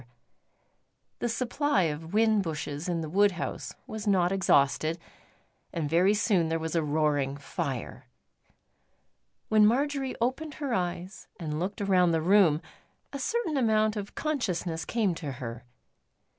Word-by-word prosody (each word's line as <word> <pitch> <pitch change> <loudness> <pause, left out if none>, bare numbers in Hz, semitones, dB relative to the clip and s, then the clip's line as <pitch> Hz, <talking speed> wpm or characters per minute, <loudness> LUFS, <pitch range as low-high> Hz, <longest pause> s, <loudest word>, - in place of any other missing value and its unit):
The 240 - -1
supply 255 -1 +1
of 160 0 -3
whin 215 0 +3
bushes 155 -1 -4
in 170 -2 -1
the 160 - -4
wood 200 +5 +3
house 180 - -5
was 215 -1 -6
not 185 -3 +3
exhausted, 160 -4 +2 0.7
and 160 -3 -2
very 180 +7 +3
soon 190 -6 +2
there 165 - +1
was 160 0 -4
a 165 - +3
roaring 145 -2 0
fire. 145 - -5 1.4
When 215 -1 +5
Marjory 270 +4 +1
opened 265 +6 -2
her 280 -5 -3
eyes 180 0 -3
and 155 -3 -3
looked 195 +4 -3
around 180 -3 +3
the 160 - +1
room, 180 -4 +4 0.5
a 280 - -4
certain 345 - -1
amount 215 -3 +2
of 205 -1 -6
consciousness 185 - -2
came 215 -6 +1
to 150 -4 -5
her. 120 -1 -7
185 Hz, 140 wpm, -28 LUFS, 160-220 Hz, 1.4 s, When